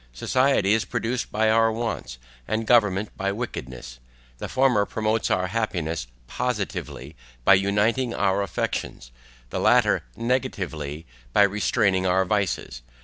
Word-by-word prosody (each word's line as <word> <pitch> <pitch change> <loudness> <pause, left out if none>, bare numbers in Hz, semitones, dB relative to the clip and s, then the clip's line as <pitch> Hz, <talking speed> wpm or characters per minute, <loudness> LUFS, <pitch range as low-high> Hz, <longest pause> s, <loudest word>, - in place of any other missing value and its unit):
Society 130 - +2
is 110 0 +2
produced 120 +2 -3
by 110 +1 +2
our 115 0 +4
wants, 110 - -4 0.3
and 110 +1 -1
government 105 -4 +2
by 100 +1 -1
wickedness; 65 - -6 0.4
the - - -5
former 130 -5 +3
promotes 110 +2 -1
our 90 0 +1
happiness 90 - -2 0.2
POSITIVELY 100 - -4 0.3
by - - +7
uniting 105 +6 +2
our 100 -2 +1
affections, 75 -9 -4 0.4
the - - -2
latter - - +4
NEGATIVELY 90 - -3 0.3
by 105 - +6
restraining 100 -1 +1
our 95 +1 +2
vices. 95 - -2
100 Hz, 125 wpm, -24 LUFS, 90-115 Hz, 0.4 s, by